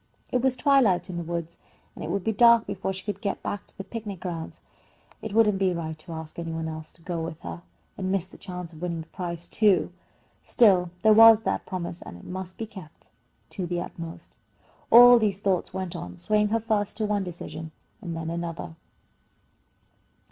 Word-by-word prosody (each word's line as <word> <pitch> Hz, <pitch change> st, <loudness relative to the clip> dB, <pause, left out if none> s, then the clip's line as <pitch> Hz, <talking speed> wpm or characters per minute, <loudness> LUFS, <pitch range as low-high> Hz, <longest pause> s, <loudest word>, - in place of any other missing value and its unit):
It 250 Hz, -, +1 dB
was 260 Hz, 0 st, +2 dB
twilight 245 Hz, -, +3 dB
in 175 Hz, -, -5 dB
the 170 Hz, -, -3 dB
woods, 170 Hz, 0 st, -5 dB, 0.4 s
and -, -, -8 dB
it 155 Hz, -, -4 dB
would 195 Hz, +1 st, -1 dB
be 220 Hz, -, +1 dB
dark 235 Hz, +1 st, +6 dB
before 190 Hz, -1 st, -3 dB
she 190 Hz, -1 st, -6 dB
could 205 Hz, -, -4 dB
get 200 Hz, -, -3 dB
back 205 Hz, -, -4 dB
to -, -, -13 dB
the 195 Hz, -, -5 dB
picnic 205 Hz, -4 st, -6 dB
grounds. 170 Hz, -3 st, -6 dB, 0.6 s
It 220 Hz, -, -5 dB
wouldn't 210 Hz, -2 st, +3 dB
be 190 Hz, -2 st, +2 dB
right 160 Hz, -1 st, -4 dB
to 165 Hz, +2 st, -9 dB
ask 160 Hz, +1 st, -7 dB
any 165 Hz, -1 st, -4 dB
one 160 Hz, 0 st, -3 dB
else 155 Hz, 0 st, -7 dB
to 165 Hz, -, -23 dB
go 170 Hz, -1 st, -3 dB
with 160 Hz, 0 st, -5 dB
her, 170 Hz, -, -7 dB, 0.4 s
and 185 Hz, -1 st, -1 dB
miss 195 Hz, -2 st, +1 dB
the -, -, -15 dB
chance 180 Hz, -2 st, -7 dB
of 160 Hz, -, -13 dB
winning 170 Hz, -2 st, -2 dB
the 160 Hz, -, -12 dB
prize, 170 Hz, -2 st, -5 dB
too. 205 Hz, -5 st, +3 dB, 0.5 s
Still, 190 Hz, -7 st, +4 dB
there 220 Hz, -, +7 dB
was 225 Hz, 0 st, +9 dB
that -, -, -2 dB
promise, 175 Hz, -2 st, -5 dB
and 85 Hz, -, -9 dB
it -, -, -15 dB
must 185 Hz, 0 st, -6 dB
be 225 Hz, -, -4 dB
kept 190 Hz, -7 st, -13 dB, 0.4 s
to 185 Hz, -4 st, -4 dB
the 175 Hz, 0 st, -2 dB
utmost. 165 Hz, -1 st, -8 dB, 0.6 s
All 245 Hz, +1 st, +9 dB
these 205 Hz, -3 st, 0 dB
thoughts 195 Hz, -3 st, 0 dB
went 185 Hz, -2 st, -4 dB
on, 90 Hz, 0 st, -7 dB
swaying 210 Hz, -1 st, +2 dB
her 225 Hz, +2 st, +1 dB
first 215 Hz, -2 st, -1 dB
to 220 Hz, -, 0 dB
one 205 Hz, -1 st, 0 dB
decision 160 Hz, -3 st, -7 dB, 0.3 s
and 170 Hz, -3 st, -5 dB
then 165 Hz, 0 st, -4 dB
another. 170 Hz, -1 st, -5 dB
185 Hz, 205 wpm, -26 LUFS, 170-210 Hz, 0.6 s, was